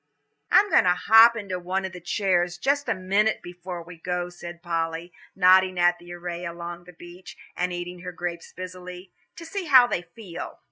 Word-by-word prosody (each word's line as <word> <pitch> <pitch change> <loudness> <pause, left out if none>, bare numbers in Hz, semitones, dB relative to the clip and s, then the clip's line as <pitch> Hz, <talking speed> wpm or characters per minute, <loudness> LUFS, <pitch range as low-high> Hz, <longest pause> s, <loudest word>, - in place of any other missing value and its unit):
"I'm 410 - +4
going - - +5
to 180 0 +4
hop 225 +5 +7
into 195 -5 -4
one 185 +2 -2
of 190 - -5
the 180 -1 -10
chairs 175 -1 0
just 280 +8 0
a - - +1
minute 195 +4 +1
before 175 0 -8
we 175 +1 -12
go," 180 +1 -3
said 175 -1 -10
Polly, 165 0 -3 0.2
nodding 185 0 +5
at 175 0 +3
the 175 0 -13
array 175 0 -6
along 170 0 -7
the 180 - -14
beach, 175 +2 -13 0.2
and 180 0 -1
eating 175 0 -6
her 180 +1 -7
grapes 175 -1 -6
busily, 180 0 -9 0.2
"to 335 - -10
see 375 +3 -5
how 260 -5 +7
they 240 - -2
feel." 175 0 -9
180 Hz, 190 wpm, -25 LUFS, 175-190 Hz, 0.2 s, hop